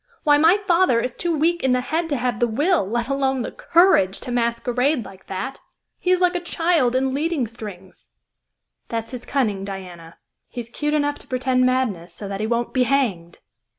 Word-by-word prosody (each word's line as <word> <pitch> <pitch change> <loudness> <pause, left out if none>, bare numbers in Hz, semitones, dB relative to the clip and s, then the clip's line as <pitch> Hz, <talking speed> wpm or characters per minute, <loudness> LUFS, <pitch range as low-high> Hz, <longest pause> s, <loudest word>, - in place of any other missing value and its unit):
"Why, 290 -2 +5
my 330 +6 +6
father 370 - +3
is 250 +1 -2
too 340 -3 -1
weak 340 +3 +1
in 260 -1 +3
the 250 - +2
head 325 +5 -2
to 285 - 0
have 245 -3 -1
the 240 - +3
will, 290 - +1
let 235 +1 -1
alone 270 -2 0
the - - -5
courage, 330 - +3
to 250 - -6
masquerade 245 +3 0
like 195 -1 -13
that. 250 +9 -5 0.4
He 360 - -2
is 365 0 +3
like 360 0 +3
a 355 - -1
child 330 -7 +1
in 260 0 +1
leading 300 -1 0
strings." 205 -5 -11 0.8
"That's 230 0 -4
his 250 -2 -8
cunning, 215 -8 0
Diana. 180 -4 -8 0.3
He's 235 -2 -7
'cute 295 +3 -1
enough 290 -1 0
to - - -17
pretend 255 0 +1
madness, 205 -10 -1
so 205 - -7
that 195 0 -5
he 215 - -1
won't 235 +1 -1
be 255 - +2
hanged!" 205 -12 0
255 Hz, 195 wpm, -22 LUFS, 220-295 Hz, 0.8 s, my